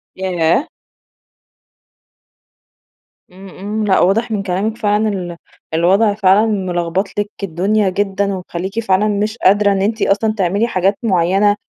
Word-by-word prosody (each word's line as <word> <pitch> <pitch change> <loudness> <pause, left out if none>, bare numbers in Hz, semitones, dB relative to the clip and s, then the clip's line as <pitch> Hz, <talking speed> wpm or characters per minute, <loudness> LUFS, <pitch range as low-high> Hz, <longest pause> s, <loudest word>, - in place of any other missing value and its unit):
ياه! 185 - 0 2.6
إمم، 190 +1 -13
إمم، 210 +3 -4
لأ 190 - +3
واضح 225 +5 +1
من 200 -2 -1
كلامك 200 +4 -2
فعلًا 215 -1 +1
ال 175 -4 -5 0.4
الوضع 195 +6 +3
فعلًا 205 +1 +3
ملخبط 185 -2 -1
لِك 205 0 -2
الدنيا 195 +4 0
جدًا، 200 +1 -1
ومخلّيكِ 185 +3 -5
فعلًا 205 -1 +1
مش 210 +2 -1
قادرة 205 +1 +3
إن 195 -1 0
أنتِ 220 +2 -1
أصلًا 215 +2 +1
تعملي 200 +5 +1
حاجات 195 -1 0
معينة 195 +1 +2
195 Hz, 130 wpm, -17 LUFS, 185-210 Hz, 2.6 s, لأ